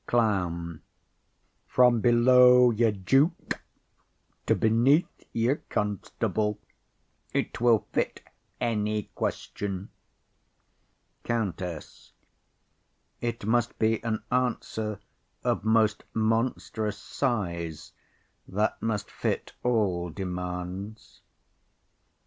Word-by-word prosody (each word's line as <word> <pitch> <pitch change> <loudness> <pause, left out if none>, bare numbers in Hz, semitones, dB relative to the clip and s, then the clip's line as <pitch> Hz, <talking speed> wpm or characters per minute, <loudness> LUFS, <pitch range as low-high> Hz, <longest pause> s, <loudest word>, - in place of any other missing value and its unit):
CLOWN. 90 -8 0 0.9
From 125 -2 +4
below 125 +1 +6
your 115 0 +3
duke 135 - +1 0.9
to - - +4
beneath 120 +9 +2
your 120 +5 +1
constable, 105 +1 -1 0.8
it - - -2
will 120 -3 +4
fit - - -1 0.4
any 105 -3 -1
question. 100 -1 -3 1.3
COUNTESS. 95 -8 -4 1.1
It 115 -3 -3
must 120 +1 +1
be 110 0 +1
an 110 -2 -2
answer 110 -4 -1 0.4
of - - 0
most 110 -1 +3
monstrous 110 -1 0
size 85 - -3 0.6
that 105 +3 -1
must 110 -2 -2
fit - - -2
all 100 -8 +1
demands. 90 +3 -6
110 Hz, 80 wpm, -27 LUFS, 100-120 Hz, 1.3 s, below